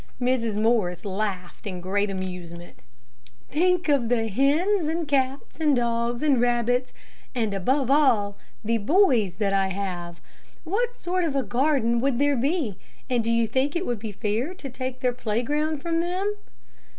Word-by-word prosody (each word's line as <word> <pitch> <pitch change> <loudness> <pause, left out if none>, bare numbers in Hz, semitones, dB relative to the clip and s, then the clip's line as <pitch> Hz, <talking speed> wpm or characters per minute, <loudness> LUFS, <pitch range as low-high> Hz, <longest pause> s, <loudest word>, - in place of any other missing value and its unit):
Mrs. 240 -4 0
Morris 215 -5 +1
laughed 195 0 -4
in 185 -2 -4
great 200 +3 0
amusement. 180 -3 -6 0.7
"Think 360 +3 +2
of 275 -6 +2
the 225 -2 +1
hens, 305 - +2
and 325 0 -1
cats, 270 +1 -1
and 300 -3 +3
dogs, 235 +1 0
and 275 -5 +3
rabbits, 245 +1 +1 0.4
and, 220 -4 0
above 260 +7 +1
all, 230 -9 +3 0.3
the 230 +1 +1
boys 235 - +3
that 200 0 0
I 195 -1 +2
have. 180 -3 -4 0.4
What 470 +8 -1
sort 360 +1 -1
of 310 -4 -1
a 270 - +1
garden 245 -3 +1
would 270 -2 +1
there 285 +1 +3
be, 265 - -1 0.3
and 240 -2 +2
do 230 - 0
you 230 0 +3
think 260 +7 0
it 350 +2 -1
would 240 -3 -2
be 220 0 -5
fair 220 - -2
to 280 -7 -7
take 255 0 -5
their 250 -2 +1
playground 280 +7 -1
from 330 -1 0
them?" 370 +4 -1
245 Hz, 160 wpm, -25 LUFS, 210-290 Hz, 0.7 s, and